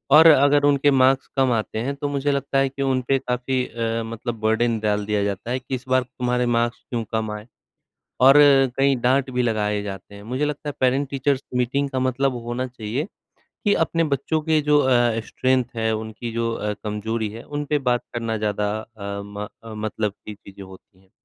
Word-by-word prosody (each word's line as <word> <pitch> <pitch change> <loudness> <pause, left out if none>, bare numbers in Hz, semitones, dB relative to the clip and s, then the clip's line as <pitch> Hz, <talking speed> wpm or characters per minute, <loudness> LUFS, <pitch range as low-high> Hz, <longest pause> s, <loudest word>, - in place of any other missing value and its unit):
और 160 +2 +9
अगर 145 -1 +5
उनके 145 0 +4
मार्क्स 135 0 +3
कम 130 -1 +3
आते 110 -1 -1
हैं, 135 +5 -2
तो 145 +1 -3
मुझे 145 0 0
लगता 140 0 -1
है 135 0 +3
कि 135 +1 -7
उनपे 135 0 +1
काफ़ी 125 0 -1
अ, 115 0 -2
मतलब 115 0 -5
बर्डन 110 +1 +1
डाल 105 -1 0
दिया 105 -1 0
जाता 100 +4 -3
है 130 - 0
कि 130 +1 -4
इस 125 0 -8
बार 130 0 +3
तुम्हारे 125 0 -1
मार्क्स 120 +1 -1
क्यों 115 -2 -2
कम 110 -1 -1
आए। 105 - -12 0.7
और 135 +3 +7 0.4
कई 135 0 +3
डाँट 130 +2 +2
भी 125 - 0
लगाए 105 -3 0
जाते 100 0 -8
हैं, 100 - -11
मुझे 130 +6 -2
लगता 150 0 -4
है 145 - -5
पेरेंट-टीचर्स 135 +1 +1 0.2
मीटिंग 140 +3 0
का 130 - -2
मतलब 130 +1 0
होना 125 +2 -2
चाहिए, 120 - -4 0.6
कि 205 - +4
अपने 165 +1 +1
बच्चों 150 +2 -1
के 155 -1 +2
जो 150 0 +4
अ, 120 -4 +2
स्ट्रेंथ 130 0 +1
है, 110 0 0
उनकी 110 +2 -6
जो 115 0 -1
अ, 105 -1 -2
कमज़ोरी 110 +1 -2
है, 115 +2 -8
उनपे 145 0 -2
बात 120 - +1
करना 115 -1 -2
ज़्यादा 105 -1 -1
अ, 110 -1 -14 0.2
म 100 +1 -6 0.2
अ, 115 -1 -9
मतलब 105 -1 -2
की 105 +1 -10
चीज़ें 100 0 -13
होती 95 0 -16
हैं। 95 -1 -28
125 Hz, 200 wpm, -23 LUFS, 110-135 Hz, 0.7 s, और